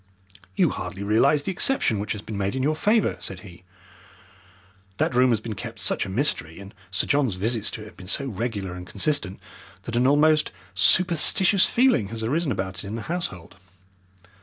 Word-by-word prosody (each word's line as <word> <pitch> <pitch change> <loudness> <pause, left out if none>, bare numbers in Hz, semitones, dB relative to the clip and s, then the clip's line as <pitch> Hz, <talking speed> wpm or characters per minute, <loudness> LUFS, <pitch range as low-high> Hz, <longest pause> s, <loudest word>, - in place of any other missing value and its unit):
"You - - +3
hardly 95 - -6
realize 135 +8 +3
the 190 - -2
exception 180 - +1
which 105 - -2
has 105 -1 -8
been 110 - -7
made 100 +3 -2
in 130 - -1
your 150 +3 +2
favour," 215 +6 +1
said 95 -2 -7
he. 90 -3 -14 1.3
"That - - 0
room 125 +1 +4
has 115 -3 +2
been 110 0 -6
kept 115 +1 -8
such - - 0
a - - -7
mystery, 95 - -1
and 100 +2 -11 0.2
Sir 95 - 0
John's 140 -8 +1
visits 110 +3 0
to 110 - -6
it - - -11
have 105 - -14
been 90 - -11
so 140 +8 0
regular 105 -5 -4
and 90 0 -9
consistent, 105 -2 -1 0.4
that 120 - -5
an 125 +2 +3
almost 150 +2 +3 0.2
superstitious 180 - +4
feeling 235 - +2
has 110 +2 -6
arisen 145 +6 0
about 95 -3 -4
it - - -9
in 105 - -5
the 115 - -5
household. 100 - -5
115 Hz, 190 wpm, -24 LUFS, 100-145 Hz, 1.3 s, room